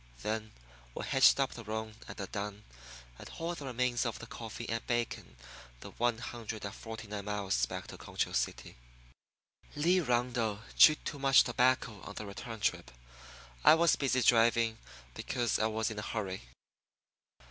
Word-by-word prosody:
Then 110 +1 -2 0.4
we - - -4
hitched 135 +1 +5
up 135 -1 +1
the 120 - -9
roan 110 0 -4
and - - -9
the 100 - -4
dun, 105 +2 -5 0.6
and - - -10
hauled 170 +1 -4
the 140 - -6
remains 125 -1 0
of 115 -3 -2
the - - -9
coffee 115 0 -7
and 115 +1 -2
bacon 120 -1 -2 0.5
the - - -9
one 120 -1 0
hundred 115 -3 -6
and 100 - -5
forty 115 0 -8
nine 100 -1 -5
miles 100 -12 0
back - - -6
to - - -10
Concho - - -2
City. - - -2 1.0
Lee 170 +5 +3
Rundle 120 - 0
chewed 155 -1 +6
much 135 -2 +5
tobacco 125 -3 +1
on 105 - -9
the 105 - -5
return 110 +3 -7
trip. - - 0 0.7
I 155 - +9
was 170 0 +4
busy 130 -2 +1
driving, 115 -1 +4 0.3
because 120 - -1
I 110 - +3
was 110 0 -1
in 105 - -5
a - - -3
hurry. 100 -3 -4
115 Hz, 165 wpm, -32 LUFS, 110-125 Hz, 1.0 s, I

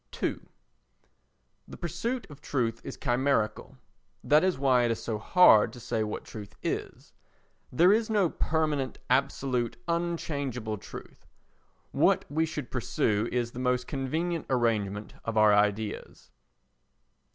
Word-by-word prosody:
ii - - 0 1.3
The - - -10
pursuit 240 -1 -3
of 145 - -13
truth 120 -5 -1
is 135 - -7
chimerical. 125 -1 0 0.5
That 150 +6 +4
is 185 -4 +1
why 130 -2 +3
it - - +1
is 115 - -1
so 110 -2 -3
hard 110 - +6
to 125 - -10
say 110 -1 -2
what 105 - -4
truth 105 -2 -9
is. - - -4 0.6
There 175 +9 +5
is 225 +1 +1
no 205 -4 +3
permanent 155 -5 -1
absolute 130 -2 0
unchangeable 145 - -2
truth; - - -11 0.6
what - - +3
we 160 +2 +1
should 150 -4 -6
pursue 115 -3 0
is 120 -1 -1
the 120 - -8
most 125 0 0
convenient 160 +5 -2
arrangement 110 -5 0
of 115 -1 -3
our 110 -1 +6
ideas. 105 +1 -1
130 Hz, 130 wpm, -28 LUFS, 110-155 Hz, 1.3 s, hard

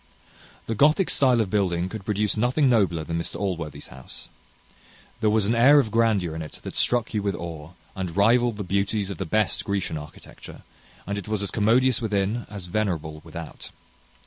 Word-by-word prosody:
The 115 - -2
Gothic 150 - +3
stile 125 -4 +3
of 100 - -3
building 90 -4 +1
could 100 0 -8
produce 105 0 0
nothing 125 +6 +2
nobler 100 -10 +2
than 85 +1 -3
Mr 85 - -4
Allworthy's 85 -6 -4
house. 65 +1 -11 0.9
There 110 -1 +2
was 105 -1 +2
an 110 - +2
air 135 +5 +6
of 115 -6 0
grandeur 105 -7 +1
in 80 - -4
it 80 - -8
that - - -7
struck 120 -1 +1
you 105 - 0
with 100 -2 -1
awe, 80 -1 -7 0.2
and 90 -2 -5
rivalled 115 +2 +3
the 105 - -3
beauties 100 +2 -1
of 95 - -7
the 95 - -3
best 105 +1 +1
Grecian 100 -6 -2
architecture; 75 +1 -12 0.4
and 100 +1 -3
it 100 - -10
was 105 -2 -1
as 100 - -3
commodious 120 +4 +3
within 105 +1 -1
as 100 -3 -8
venerable 85 -6 -2
without. 80 0 -9
100 Hz, 185 wpm, -25 LUFS, 85-115 Hz, 0.9 s, air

